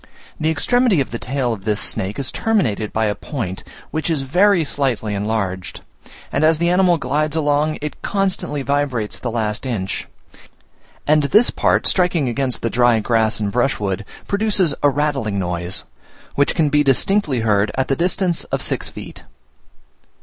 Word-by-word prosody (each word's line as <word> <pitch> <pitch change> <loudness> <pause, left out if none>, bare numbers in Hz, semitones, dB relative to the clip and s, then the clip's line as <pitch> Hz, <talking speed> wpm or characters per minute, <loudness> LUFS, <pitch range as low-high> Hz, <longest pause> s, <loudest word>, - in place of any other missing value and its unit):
The 155 - +1
extremity 230 - +2
of 135 - -1
the 115 - -4
tail 125 -2 -1
of 100 -3 -8
this 105 -1 0
snake 95 +5 -2
is 140 -2 -1
terminated 120 - 0
by 110 0 0
a 105 - +1
point, 105 - -5 0.3
which 155 +2 -2
is 155 -4 0
very 180 +6 +3
slightly 130 -8 -1
enlarged; 100 -3 -3 0.5
and 140 - 0
as 160 0 +4
the 170 +2 +1
animal 180 -1 +4
glides 150 +1 -1
along, 150 0 +1
it 150 - -5
constantly 190 -8 -1
vibrates 135 -6 -1
the 125 - -3
last 110 -2 -2
inch; 105 -7 -3 1.0
and 150 -1 +3
this 215 +11 +4
part - - +1
striking 175 -6 +2
against 125 +1 -1
the 115 - +1
dry 120 -2 +3
grass 110 -1 +1
and 105 -2 -1
brushwood, 105 -6 0 0.2
produces 200 -6 +2
a 145 - +5
rattling 135 -7 -1
noise, 90 -1 -2 0.5
which 140 - +1
can 155 -3 +2
be 150 +1 +3
distinctly 140 - +2
heard 105 -2 +2
at 130 0 0
the 135 - +1
distance 180 +1 0
of - - -3
six - - -2
feet. - - -10
135 Hz, 165 wpm, -19 LUFS, 110-160 Hz, 1.0 s, a